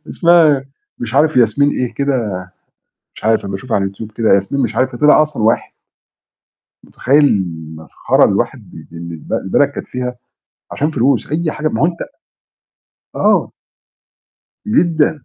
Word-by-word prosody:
اسمها 160 -5 +4 0.3
مش 120 +1 -6
عارف 155 +1 +3
ياسمين 125 +4 +3
إيه 125 -4 -3
كده، 130 -8 -1 0.8
مش - - -12
عارف 110 0 +2
أمّا 100 -1 -5
أشوفها 120 +4 -3
على 95 -1 -1
YouTube 110 +2 -9
كده، 115 -1 +1
ياسمين 100 +8 0
مش 115 -3 -2
عارف 130 +1 0
إيه 120 - -9
طِلِع 150 +1 +6
أصلًا 150 -7 -3
واحد. 110 +2 +1 1.1
متخيّل 145 +4 +2
المسخرة 80 - -1
اللي - - +2
الواحد - - -3 0.2
اللي 85 0 -7
الب 80 - -11
البلد - - +1
كانت - - -7
فيها، 125 0 -5 0.6
عشان 150 +2 -1
فلوس، 140 0 0
أي 160 0 -1
حاجة 155 +1 -2
ما 110 - -3
هو 165 - +5
أنت 170 -1 -4 1.2
آه. - - +2 1.2
جدًا. 160 - +1
125 Hz, 150 wpm, -16 LUFS, 110-150 Hz, 1.2 s, طِلِع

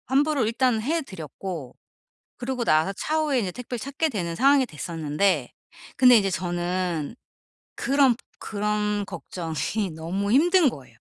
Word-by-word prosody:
환불을 280 -2 +2
일단 235 0 +1
해 320 +6 0
드렸고 165 - -7 0.6
그러고 250 0 -2
나서 160 +5 +3
차후에 305 +2 0
이제 195 -5 -2
택배를 245 +2 -6
찾게 280 +6 -1
되는 170 -8 -3
상황이 275 +2 +4
됐었는데 165 - -1 0.5
근데 250 -2 +8
이제 195 -2 +2
저는 175 -1 -2 0.6
그런 270 -3 +3 0.2
그런 210 -1 -1
걱정이 175 +2 -3
너무 190 +6 -2
힘든 335 +3 +5
거예요. - - -12
210 Hz, 285 characters per minute, -25 LUFS, 175-265 Hz, 0.6 s, 근데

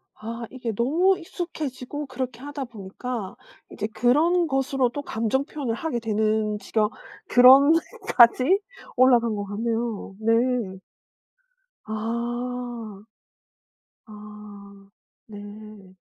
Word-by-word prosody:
아. 230 +2 -6
이게 250 -3 -4
너무 335 - +2
익숙해지고 300 -5 -5
그렇게 255 -2 -5
하다 285 0 -6
보니까 220 0 -6 0.4
이제 210 - -3
그런 315 +10 +2
것으로도 270 -1 0
감정 230 +1 -1
표현을 280 -6 -4
하게 240 +1 -3
되는 215 -1 0
지경 215 0 0 0.4
그런까지 265 +2 +5 0.4
올라간 240 -3 +4
것 205 -1 -4
같네요. 225 0 -3
네. 230 -3 +1 1.1
아. 235 -1 -4 1.0
아. 210 -2 -13 0.4
네. 205 -2 -11
235 Hz, 195 characters per minute, -24 LUFS, 215-260 Hz, 1.1 s, 그런까지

